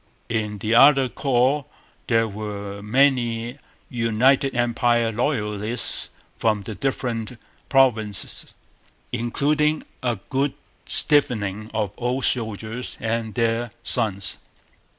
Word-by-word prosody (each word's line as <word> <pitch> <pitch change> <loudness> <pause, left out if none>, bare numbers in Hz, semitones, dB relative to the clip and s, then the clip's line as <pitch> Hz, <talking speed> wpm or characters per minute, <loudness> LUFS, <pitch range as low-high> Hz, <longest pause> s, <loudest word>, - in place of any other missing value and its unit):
In 105 -2 -2
the 105 +3 -1
other 135 +2 +6
corps 130 +2 +1 0.4
there 115 -1 +2
were 100 -1 -6
many 120 +1 +1 0.3
United 125 +3 +2
Empire 120 -1 +1
Loyalists 110 -2 0 0.3
from 110 -3 0
the 110 - -6
different 120 -2 -3 0.3
provinces, 115 -7 +2 0.6
including 150 +6 0 0.2
a 120 -2 0 0.2
good 135 +1 0 0.3
stiffening 110 -8 +2
of 105 -3 -2
old 125 +2 -1
soldiers 110 0 -2
and 115 -1 -3
their 115 0 0
sons. 100 -5 +2
115 Hz, 95 wpm, -23 LUFS, 110-130 Hz, 0.6 s, other